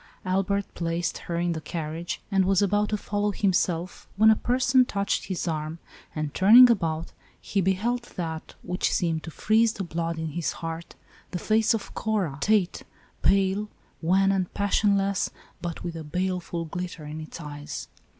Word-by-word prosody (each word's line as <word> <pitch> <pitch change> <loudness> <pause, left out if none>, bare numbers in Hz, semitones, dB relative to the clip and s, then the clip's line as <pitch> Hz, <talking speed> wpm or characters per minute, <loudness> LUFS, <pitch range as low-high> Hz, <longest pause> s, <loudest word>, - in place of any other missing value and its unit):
Albert 195 +2 +1
placed 170 0 -2
her 170 - -1
in 175 +1 0
the 160 -1 -3
carriage, 160 +1 -4
and 195 -1 +4
was 195 -1 +3
about 205 +1 +2
to 210 - 0
follow 205 0 -1
himself, 180 -3 0
when 220 +1 +7
a - - +5
person 255 +2 +3
touched 200 -4 -1
his 185 -2 -3
arm, 155 0 -2 0.4
and, 155 -1 -3
turning 235 +6 +8
about, 165 -6 -1 0.3
he 200 - -1
beheld 220 +7 0
that, 160 -3 -5
which 180 +1 -1
seemed 165 -3 0
to - - -7
freeze 220 +6 +2
the 195 - -4
blood 165 -1 -3
in 160 0 -3
his 165 +2 -2
heart, 165 0 -6 0.2
— - - -27
the - - 0
face 220 +4 +2
of 210 - -6
Cora 195 -11 -1
Tate, 210 -2 +2 0.4
pale, 195 +2 +2 0.3
wan 190 +4 +3
and 190 -2 0
passionless, 200 -1 +2 0.3
but 170 -2 -5
with 170 -1 -4
a 160 - -5
bale 180 +4 -1
ful 170 -1 -5
glitter 170 -1 -5
in 155 +1 -6
its 155 - -9
eyes. 145 -2 -6
180 Hz, 170 wpm, -26 LUFS, 165-205 Hz, 0.4 s, turning